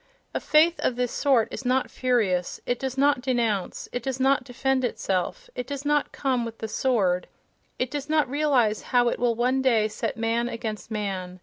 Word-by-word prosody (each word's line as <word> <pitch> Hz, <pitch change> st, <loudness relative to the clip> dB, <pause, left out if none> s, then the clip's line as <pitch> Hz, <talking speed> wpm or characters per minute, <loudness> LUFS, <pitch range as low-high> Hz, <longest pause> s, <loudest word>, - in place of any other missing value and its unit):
A -, -, -1 dB
faith 330 Hz, +3 st, +4 dB
of 250 Hz, -, 0 dB
this 245 Hz, -1 st, -1 dB
sort 265 Hz, -6 st, +2 dB
is -, -, -6 dB
not 255 Hz, +1 st, +1 dB
furious, 215 Hz, -9 st, 0 dB
it 245 Hz, -, -1 dB
does 265 Hz, 0 st, -4 dB
not 280 Hz, -1 st, +3 dB
de 255 Hz, 0 st, 0 dB
nounce, 215 Hz, -6 st, -1 dB
it 245 Hz, -, -3 dB
does 260 Hz, +2 st, -3 dB
not 265 Hz, 0 st, +3 dB
defend 260 Hz, +1 st, -1 dB
itself: 230 Hz, -, -2 dB
it 250 Hz, -, -5 dB
does 280 Hz, 0 st, -5 dB
not 295 Hz, 0 st, +1 dB
come 260 Hz, -3 st, 0 dB
with 230 Hz, -1 st, -6 dB
"the 220 Hz, -, -4 dB
sword"—it 220 Hz, +2 st, -2 dB
does 290 Hz, 0 st, -4 dB
not 310 Hz, -2 st, +3 dB
realize 260 Hz, -6 st, +2 dB, 0.2 s
how 240 Hz, -1 st, +5 dB
it -, -, -3 dB
will 240 Hz, -1 st, +2 dB
one 250 Hz, +3 st, +1 dB
day 230 Hz, -5 st, +3 dB
set 215 Hz, -, -4 dB
man 230 Hz, +1 st, 0 dB
against 220 Hz, -2 st, -5 dB
man. 190 Hz, -4 st, -4 dB
245 Hz, 195 wpm, -25 LUFS, 225-270 Hz, 0.2 s, how